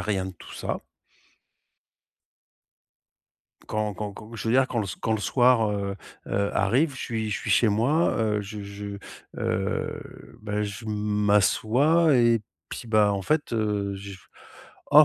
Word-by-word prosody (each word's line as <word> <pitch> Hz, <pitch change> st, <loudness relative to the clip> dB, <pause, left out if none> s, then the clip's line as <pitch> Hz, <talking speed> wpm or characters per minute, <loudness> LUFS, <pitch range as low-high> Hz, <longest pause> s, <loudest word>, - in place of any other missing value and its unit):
rien 95 Hz, -3 st, -1 dB
de 95 Hz, -, -6 dB
tout -, -, -12 dB
ça. -, -, -4 dB, 2.9 s
Quand 105 Hz, -1 st, -1 dB
quand 105 Hz, +1 st, -5 dB
quand, 110 Hz, +3 st, -11 dB
je 115 Hz, -, -4 dB
veux 120 Hz, -, +2 dB
dire, 130 Hz, 0 st, +5 dB
quand 120 Hz, -, -3 dB
le 105 Hz, -, +1 dB
s -, -, -6 dB
quand 110 Hz, -, 0 dB
le 110 Hz, -, 0 dB
soir, 120 Hz, -2 st, +3 dB
heu 100 Hz, -1 st, -2 dB, 0.3 s
heu, 100 Hz, +1 st, 0 dB
arrive, 130 Hz, +11 st, +3 dB
je -, -, -7 dB
suis 110 Hz, -2 st, -2 dB
je -, -, -1 dB
suis -, -, -4 dB
chez 115 Hz, -, +5 dB
moi. 125 Hz, +11 st, +2 dB
Heu, 105 Hz, -2 st, +1 dB
je 105 Hz, +1 st, -7 dB
je, 100 Hz, +1 st, -7 dB, 0.5 s
heu, -, -, -3 dB
bah, 105 Hz, 0 st, -2 dB
je 105 Hz, +2 st, -5 dB
m'assois 110 Hz, -, +3 dB
et 120 Hz, -2 st, +4 dB, 0.3 s
puis, 120 Hz, -, -7 dB
ben, 105 Hz, -2 st, +4 dB
en 100 Hz, -1 st, -1 dB
fait, 150 Hz, +2 st, 0 dB
heu, 105 Hz, -3 st, 0 dB
je 100 Hz, 0 st, -8 dB, 0.7 s
oh 150 Hz, +1 st, +9 dB
105 Hz, 160 wpm, -26 LUFS, 100-120 Hz, 2.9 s, oh